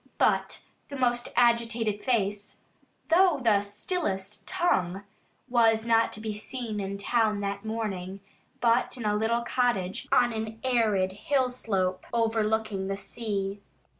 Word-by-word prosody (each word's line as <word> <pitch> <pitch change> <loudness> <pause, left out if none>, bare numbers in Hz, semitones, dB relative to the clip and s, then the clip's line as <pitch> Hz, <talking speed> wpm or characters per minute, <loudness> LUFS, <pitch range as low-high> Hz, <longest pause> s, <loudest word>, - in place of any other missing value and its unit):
But - - +1 0.3
the 285 - -6
most 245 -2 0
agitated 235 -3 +2
face, 205 -4 -1 0.5
though 350 -3 +5
the 220 -5 +3
stillest 205 - -3
tongue, 190 - 0 0.4
was 225 -3 +3
not 230 -1 +3
to - - -5
be 215 0 -4
seen 220 0 -4
in 200 0 -3
town 215 0 +1
that 200 0 -3
morning, 200 -4 -4 0.4
but 235 +2 +2
in 235 - -5
a 210 0 +2
little 230 +2 +1
cottage 235 -7 0
on 240 -1 +4
an 220 0 -5
arid 220 -7 +2
hill 255 +6 0
slope 190 -7 -1
overlooking 220 -3 0
the 195 0 -2
sea. 200 -2 -4
220 Hz, 135 wpm, -28 LUFS, 200-235 Hz, 0.5 s, though